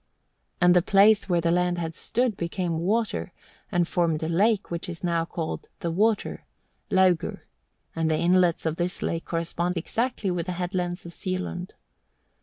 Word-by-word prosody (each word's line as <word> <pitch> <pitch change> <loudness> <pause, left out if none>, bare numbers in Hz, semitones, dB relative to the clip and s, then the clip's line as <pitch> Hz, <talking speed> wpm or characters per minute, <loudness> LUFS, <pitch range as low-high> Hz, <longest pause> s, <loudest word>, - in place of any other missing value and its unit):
And 180 0 +5
the 180 - +6
place 200 +3 +4
where 175 -1 +2
the 165 0 +1
land 180 0 +1
had 165 -1 -3
stood 240 +6 0
became 170 -1 -2
water, 205 +2 0 0.4
and 175 -2 +2
formed 165 -3 0
a - - -1
lake 200 +5 +2
which 170 +1 -3
is 170 0 -8
now 170 -2 +1
called 165 -1 -5
"The 170 - -1
Water" 210 +5 +1 0.5
(Laugur), 185 -3 +2 0.5
and 165 -1 0
the 155 - +2
inlets 175 -1 +3
of 160 0 -1
this 175 +1 -2
lake 165 0 -2
correspond 170 +1 -2
exactly 220 +3 -1
with 175 0 -2
the 180 - -2
headlands 180 0 -3
of 170 - -8
Sealund. 185 0 -4
175 Hz, 165 wpm, -26 LUFS, 170-190 Hz, 0.5 s, the